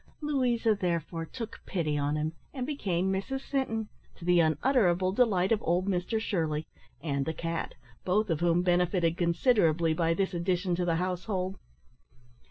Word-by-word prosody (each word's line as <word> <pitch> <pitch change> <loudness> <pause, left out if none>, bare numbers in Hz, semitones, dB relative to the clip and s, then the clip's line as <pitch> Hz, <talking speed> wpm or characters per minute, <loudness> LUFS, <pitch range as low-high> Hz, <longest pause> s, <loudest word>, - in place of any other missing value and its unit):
Louisa 250 -7 +1
therefore 170 -4 -2
took 230 +2 -7
pity 155 -5 -1
on 145 +1 0
him, 155 +1 -1 0.2
and 255 -2 -2
became 190 - -1
Mrs 265 +8 -3
Sinton, 225 -6 -2 0.3
to 170 - -11
the 175 0 +4
unutterable 185 - +3
delight 195 -4 +2
of 220 - +3
old 175 +2 +1
Mr 195 +4 0
Shirley 160 -8 -1 0.4
and 140 -3 0
the 160 +3 -3
cat, 165 +1 -3 0.3
both 205 +1 +1
of 160 - 0
whom 175 0 +2
benefited 175 -1 +2
considerably 170 - +2
by 165 0 +1
this 195 +1 0
addition 180 +1 0
to 175 +1 0
the 170 -2 +1
household. 185 +2 -2
180 Hz, 155 wpm, -29 LUFS, 165-210 Hz, 0.4 s, the